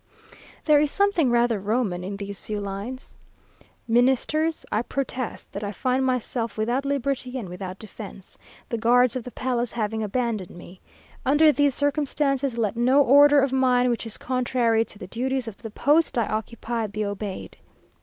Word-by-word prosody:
There 300 -2 +6
is 295 0 +2
something 400 -6 +2
rather 235 -2 +2
Roman 200 -3 -1
in 200 +2 -5
these 200 -1 -6
few 210 -1 -4
lines: 200 +6 -6 0.7
"Ministers, 265 +7 +2
I 215 - +1
protest 255 -1 -4
that 200 - -5
I 205 - -3
find 255 +5 0
myself 250 -3 -2
without 240 +5 0
liberty 275 -2 -2
and 225 -7 -5
without 185 +1 -7
defence, 200 -2 -10 0.3
the 230 - -3
guards 245 +2 +4
of 255 - -3
the 250 - -7
palace 245 -2 -2
having 220 -1 -2
abandoned 215 -4 -2
me. 180 +1 -13 0.4
Under 300 +3 +5
these 285 -2 +2
circumstances, 285 -3 0
let 220 -2 0
no 255 +4 +4
order 285 +2 +6
of 270 -1 0
mine, 250 -1 +3
which 235 -1 -3
is 225 - -5
contrary 245 -3 +1
to 210 - -12
the - - -8
duties 255 +4 -2
of 220 - -7
the 225 - -8
post 295 +7 +2
I 235 - +2
occupy, 225 +1 -3
be 210 +1 -3
obeyed. 200 -1 -5
240 Hz, 165 wpm, -24 LUFS, 215-265 Hz, 0.7 s, There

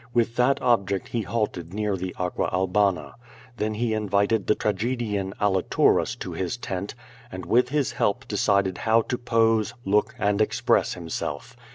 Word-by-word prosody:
With 115 0 +2
that 125 +3 +3
object 100 -6 +1
he 115 - -1
halted 95 -4 -3
near 105 -2 0
the 95 0 -5
Aqua 90 -1 -1
Albana. 95 -2 +1 0.4
Then 110 0 -1
he 115 0 0
in 105 -2 -2
vited 100 +1 +2
the 105 - +4
tragedian 105 -2 -2
Aliturus 95 -3 +2
to - - -4
his 95 +3 -3
tent, 100 -2 -5 0.4
and 95 -1 -7
with 125 +2 +3
his 145 -2 0
help 100 - -1
de 105 - -4
cided 100 -2 +2
how 115 0 +3
to 125 - -3
pose, 115 -2 +2
look, 105 +2 +1
and 100 +1 +1
express 110 - +1
himself. 85 +4 -5
105 Hz, 165 wpm, -25 LUFS, 95-115 Hz, 0.4 s, the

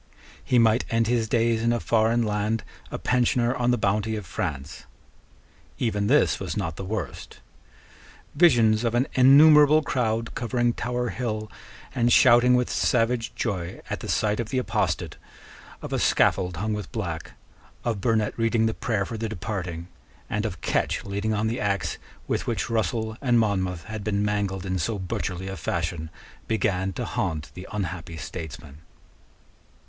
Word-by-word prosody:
He 125 - +2
might 115 0 +4
end 115 0 +2
his 115 -1 0
days 115 -1 +2
in 115 +1 +2
a 120 - +1
foreign 115 +1 +2
land 105 +1 -1 0.3
a - - -4
pensioner 120 -1 +1
on 120 -1 0
the 125 - +3
bounty 105 +1 0
of 105 -3 -5
France. 75 +1 -5 0.9
Even 105 -4 0
this - - +3
was - - -4
not 80 -1 -2
the 95 - -6
worst. 95 -1 -5 0.9
Visions 115 -10 +4
of 115 0 0
an 125 +3 +2
innumerable 150 +3 +7
crowd 115 -4 -1
covering 120 0 0
Tower 125 0 -2
Hill 110 0 -4 0.4
and 120 -2 +2
shouting 125 0 +6
with 125 0 +2
savage 115 -1 +1
joy 95 -5 -3
at - - -2
the - - -7
sight 105 0 +1
of 115 -2 -3
the 130 - -2
apostate, 130 - -1 0.7
of - - -5
a - - +1
scaffold 90 -3 +2
hung 105 +4 -1
with 105 -1 -5
black, 85 -9 -4 0.5
of 115 -5 -1
Burnet 110 -1 +1
reading 115 0 +2
the 110 - +1
prayer 105 -5 -1
for 115 +1 -6
the 115 0 -2
departing, 90 -4 -5 0.4
and 105 +1 0
of 90 -6 -8
Ketch - - -1
leaning 100 +2 -1
on 105 +1 0
the 115 +2 -1
axe 100 -1 -1 0.3
with - - -2
which - - -2
Russell 110 0 -1
and 125 -3 +3
Monmouth 95 -5 0
had 110 -2 -6
been 105 -1 0
mangled 100 -2 -1
in 95 -1 -1
so 105 +6 -1
butcherly 95 0 -4
a 95 - -4
fashion, 85 -1 -3 0.4
began 95 -4 0
to - - -4
haunt 80 -4 -3
the 90 - -9
unhappy 90 -5 -4
statesman. 75 -3 -8
110 Hz, 165 wpm, -25 LUFS, 95-120 Hz, 0.9 s, innumerable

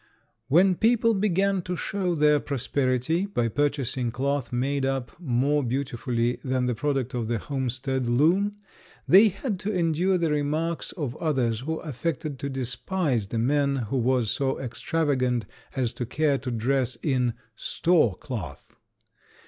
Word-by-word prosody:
When 180 +7 +5
people 230 +3 +3
began 195 -1 +1
to 180 +1 -4
show 180 +1 -1
their 150 -1 +4
prosperity 140 - 0
by 120 -12 0
purchasing 135 -2 0
cloth 135 0 -2
made 135 +3 0
up 135 -2 -1
more 145 -1 +1
beautifully 125 -2 -1
than 130 -1 0
the 125 - +1
product 135 0 -1
of 120 -3 -2
the 115 0 0
homestead 130 0 -2
loom 170 +12 +3 0.5
they 200 +4 +8
had 200 +1 -3
to 210 - -2
endure 180 0 +2
the 165 -3 0
remarks 155 +3 -1
of 145 -8 -4
others 130 -8 0
who 155 +6 -3
affected 155 -1 -3
to 140 - -3
despise 130 - -1
the 115 - -3
man 140 +4 +2
who 130 0 -2
was 125 -3 +2
so 135 -2 -1
extravagant 130 -2 0 0.3
as 125 -3 0
to 120 - -4
care 145 +1 +1
to 130 - -5
dress 125 +2 0
in 125 -5 +1 0.2
"store 160 - +2
cloth." 90 - -7
135 Hz, 145 wpm, -26 LUFS, 125-165 Hz, 0.5 s, they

